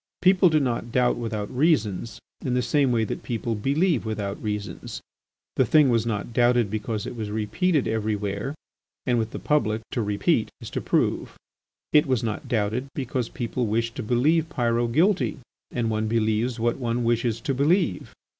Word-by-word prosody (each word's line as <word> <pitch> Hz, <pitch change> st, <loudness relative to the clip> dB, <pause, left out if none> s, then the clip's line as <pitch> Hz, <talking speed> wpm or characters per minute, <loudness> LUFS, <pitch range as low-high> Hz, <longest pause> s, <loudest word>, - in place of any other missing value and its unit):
People 185 Hz, 0 st, +6 dB
do 155 Hz, -1 st, +3 dB
not 120 Hz, -3 st, -2 dB
doubt 125 Hz, 0 st, +3 dB
without 110 Hz, -2 st, -4 dB
reasons 115 Hz, -, +1 dB, 0.3 s
in 125 Hz, -2 st, 0 dB
the 125 Hz, -, +1 dB
same 140 Hz, -2 st, +2 dB
way 115 Hz, -2 st, +2 dB
that 110 Hz, -, -4 dB
people 115 Hz, -1 st, -2 dB
believe 140 Hz, -, +1 dB
without 105 Hz, -3 st, -4 dB
reasons. 105 Hz, -1 st, -4 dB, 0.6 s
The -, -, +5 dB
thing 150 Hz, +2 st, +5 dB
was 115 Hz, -1 st, +2 dB
not 110 Hz, +1 st, -3 dB
doubted 120 Hz, -3 st, +3 dB
because 110 Hz, 0 st, -3 dB
it -, -, -6 dB
was 110 Hz, -3 st, -4 dB
repeated 130 Hz, -, 0 dB
everywhere 105 Hz, +3 st, -2 dB, 0.5 s
and, 125 Hz, -2 st, +2 dB
with 110 Hz, -1 st, -1 dB
the -, -, -6 dB
public, 115 Hz, -7 st, 0 dB
to 120 Hz, -, -1 dB
repeat 110 Hz, -, +1 dB
is -, -, -9 dB
to -, -, -2 dB
prove. -, -, 0 dB, 0.6 s
It 150 Hz, +1 st, +5 dB
was 130 Hz, -4 st, +1 dB
not 115 Hz, +5 st, -3 dB
doubted 115 Hz, +2 st, 0 dB
because 130 Hz, -3 st, -2 dB
people 120 Hz, 0 st, -2 dB
wished 115 Hz, +2 st, 0 dB
to 130 Hz, -, -5 dB
believe 150 Hz, +8 st, +2 dB
Pyrot 120 Hz, -3 st, 0 dB
guilty 180 Hz, -, +2 dB, 0.3 s
and 115 Hz, -2 st, -1 dB
one 110 Hz, 0 st, 0 dB
believes 115 Hz, +2 st, 0 dB
what 120 Hz, +3 st, 0 dB
one 120 Hz, -1 st, -1 dB
wishes 115 Hz, -1 st, +1 dB
to 135 Hz, -, -1 dB
believe. 145 Hz, -, +1 dB
120 Hz, 175 wpm, -25 LUFS, 110-135 Hz, 0.6 s, People